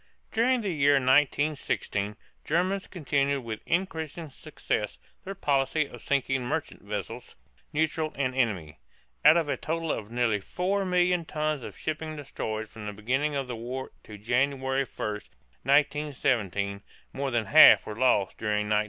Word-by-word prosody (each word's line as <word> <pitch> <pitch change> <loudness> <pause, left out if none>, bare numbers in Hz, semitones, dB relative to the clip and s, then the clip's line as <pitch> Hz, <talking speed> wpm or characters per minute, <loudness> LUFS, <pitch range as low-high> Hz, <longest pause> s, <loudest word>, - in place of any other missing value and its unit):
During 245 +2 +2
the 200 -3 -2
year 145 -2 +4
1916 135 -6 +1 0.3
Germans 185 +5 0
continued 140 -4 0
with 110 -2 -5
increasing 165 -3 -2
success 130 -7 -3 0.3
their 195 +1 -6
policy 145 -2 +1
of - - -12
sinking 135 -2 0
merchant 150 +5 -3
vessels, 100 -2 -6 0.4
neutral 155 0 0
and 130 -2 -1
enemy. 100 - -1 0.4
Out 155 +3 +8
of 165 -3 +1
a - - -1
total 165 0 -2
of 105 -1 -4
nearly 120 -3 +1
4,000,000 180 - +1
tons 155 -2 -1
of - - -9
shipping 155 0 -4
destroyed 110 -6 -4
from 105 -1 -9
the 105 - -4
beginning 130 +8 -1
of 135 -1 -1
the 125 - -4
war 125 +3 -5
to 105 - -10
January 130 +4 0
1, 105 -3 -4 0.4
1917, 130 - +1 0.3
more 140 0 -2
than 120 -3 0
half - - +8
was 105 +1 -7
lost 125 -7 +2
during 105 -1 0
1916. 105 0 +4
140 Hz, 145 wpm, -28 LUFS, 110-155 Hz, 0.4 s, Out